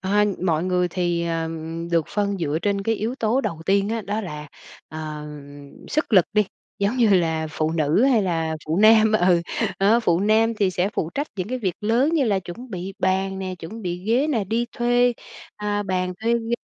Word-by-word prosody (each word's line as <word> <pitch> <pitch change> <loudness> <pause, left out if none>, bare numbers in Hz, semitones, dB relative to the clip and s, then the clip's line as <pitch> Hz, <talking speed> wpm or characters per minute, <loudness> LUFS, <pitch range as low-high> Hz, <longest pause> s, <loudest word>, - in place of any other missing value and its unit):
Ờ, 205 +2 +2 0.2
mọi 165 -2 +1
người 180 -1 +1
thì, 175 -1 -1
ờ, 165 -1 -1
ừm, 165 +1 -5
được 165 -2 +2
phân 200 -1 -1
dựa 155 -2 -1
trên 200 0 0
cái 225 +3 +1
yếu 225 +4 -3
tố 235 +1 +1
đầu 165 -11 -4
tiên 200 +1 +2
á, 225 +1 -1
đó 210 +3 -2
là, 150 -6 -7 0.4
ờ, 155 - -8 0.2
ờm, 145 -1 -10 0.2
sức 305 -5 -1
lực 185 -5 +7
đi. 210 0 +3 0.3
Giống 200 +5 0
như 235 -3 +4
là 165 -5 +2
phụ 155 0 -1
nữ 160 +5 +2
hay 250 -6 +4
là 165 -3 -1
phụ 155 +2 -1
nam, 220 0 +6
ừ, 180 -4 +4 0.4
đó, 210 +5 +4
phụ 175 -5 +2
nam 220 +2 +3
thì 200 -4 +1
sẽ 180 +1 0
phụ 160 - -2
trách 285 +2 -1
những 185 +2 -3
cái 255 - -2
việc 190 -7 -1
lớn 230 +7 +2
như 300 -5 +3
là 205 -5 +2
chuẩn 190 +7 -9
bị 185 +1 -5
bàn 190 +1 0
nè, 185 -1 -4
chuẩn 195 +8 -8
bị 175 -1 -3
ghế 240 +7 +2
nè, 240 -9 0
đi 225 +5 -1
thuê, 245 +1 +3 0.4
à, 205 0 -1
bàn 185 -2 -1
thuê 230 +1 +2
ghế 235 0 -1
195 Hz, 215 wpm, -23 LUFS, 170-220 Hz, 0.4 s, lực